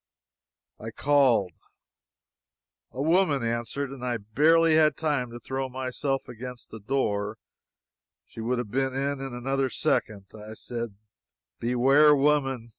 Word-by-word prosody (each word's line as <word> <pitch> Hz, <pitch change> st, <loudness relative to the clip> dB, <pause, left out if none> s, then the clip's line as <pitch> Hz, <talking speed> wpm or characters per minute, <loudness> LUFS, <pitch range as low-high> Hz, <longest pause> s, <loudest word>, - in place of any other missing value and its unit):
I 115 Hz, -, -6 dB
called. 125 Hz, -7 st, +2 dB, 1.4 s
A 130 Hz, -, -4 dB
woman 160 Hz, -5 st, +2 dB
answered, 120 Hz, +4 st, -3 dB
and 135 Hz, -2 st, -9 dB
I 125 Hz, -1 st, -1 dB
barely 155 Hz, +10 st, +3 dB
had 155 Hz, -2 st, +4 dB
time 145 Hz, -6 st, -1 dB
to 120 Hz, +1 st, -9 dB
throw 130 Hz, +1 st, -4 dB
myself 130 Hz, +1 st, -3 dB
against 125 Hz, +1 st, -9 dB
the 110 Hz, -, -8 dB
door 105 Hz, -3 st, -1 dB, 0.9 s
she 115 Hz, -, -10 dB
would 125 Hz, +3 st, -1 dB
have 120 Hz, -4 st, -4 dB
been 135 Hz, 0 st, -1 dB
in, 140 Hz, 0 st, -2 dB
in 135 Hz, -2 st, -5 dB
another 135 Hz, +2 st, -1 dB
second. 105 Hz, -4 st, -1 dB
I 110 Hz, 0 st, -10 dB
said: 115 Hz, -2 st, -5 dB, 0.6 s
"Beware, 135 Hz, +5 st, +5 dB
woman! 135 Hz, -4 st, +1 dB
130 Hz, 130 wpm, -26 LUFS, 115-140 Hz, 1.4 s, Beware